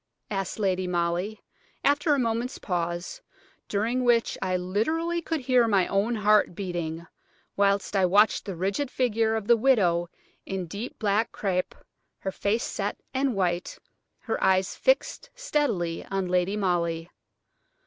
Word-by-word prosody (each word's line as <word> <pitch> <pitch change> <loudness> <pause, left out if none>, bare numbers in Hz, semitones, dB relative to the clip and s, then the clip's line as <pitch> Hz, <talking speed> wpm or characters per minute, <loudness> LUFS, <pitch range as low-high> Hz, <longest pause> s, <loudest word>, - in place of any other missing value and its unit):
asked 195 -2 -2
Lady 185 -3 0
Molly, 175 +4 -1 0.4
after 290 +1 +3
a - - 0
moment's 235 +1 -1
pause, 175 - -3 0.5
during 230 +5 0
which 240 -2 +3
I 185 -1 0
literally 315 - -1
could 325 -2 -2
hear 250 -2 +3
my 195 -4 +3
own 205 +5 0
heart 210 -3 +3
beating, 170 -3 -4 0.5
whilst 200 0 +1
I 190 -2 +4
watched 205 +4 +4
the 195 -3 -5
rigid 195 - -1
figure 225 -3 +1
of 220 -2 -3
the 235 +2 +6
widow 195 -9 +2 0.3
in 190 -2 -4
deep 200 +9 -6
black 215 +1 +1
crape, 185 -3 -2 0.4
her 190 - -4
face 210 +5 0
set - - -3
and 265 -2 0
white, 180 -2 -1 0.4
her - - -3
eyes 190 0 +2
fixed - - +1
steadily 275 - -1
on 195 -1 -2
Lady 180 +3 +1
Molly. 170 -4 0
200 Hz, 140 wpm, -26 LUFS, 180-235 Hz, 0.5 s, the